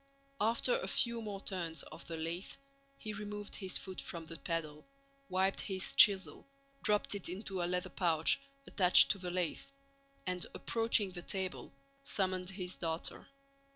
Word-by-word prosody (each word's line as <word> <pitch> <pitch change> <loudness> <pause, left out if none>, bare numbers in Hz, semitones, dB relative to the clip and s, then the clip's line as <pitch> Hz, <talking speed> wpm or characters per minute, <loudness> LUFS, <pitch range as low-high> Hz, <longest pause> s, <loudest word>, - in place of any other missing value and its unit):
After 235 - +3
a - - -4
few 235 -1 +3
more 205 -3 -5
turns 170 -5 -1
of - - -11
the 165 -1 -5
lathe 165 +4 -4 0.4
he 215 -2 -6
removed 205 0 -6
his 190 -3 0
foot 190 -2 -4
from 165 -1 -6
the 165 +1 -8
pedal, 155 -3 -3 0.5
wiped 190 +1 +1
his 190 -1 -3
chisel, 195 +3 +5 0.3
dropped 210 0 +3
it 200 -4 -4
into 190 0 -4
a - - +1
leather 180 0 -1
pouch 165 - +2 0.3
attached 185 -2 +6
to 200 - -2
the 180 -1 -4
lathe, 175 -2 -1 0.6
and, 180 -2 0
approaching 225 -4 +1
the 175 -1 -7
table, 190 +1 -3 0.3
summoned 185 -5 -1
his 185 -2 -5
daughter. 165 -1 -3
185 Hz, 155 wpm, -34 LUFS, 175-205 Hz, 0.6 s, attached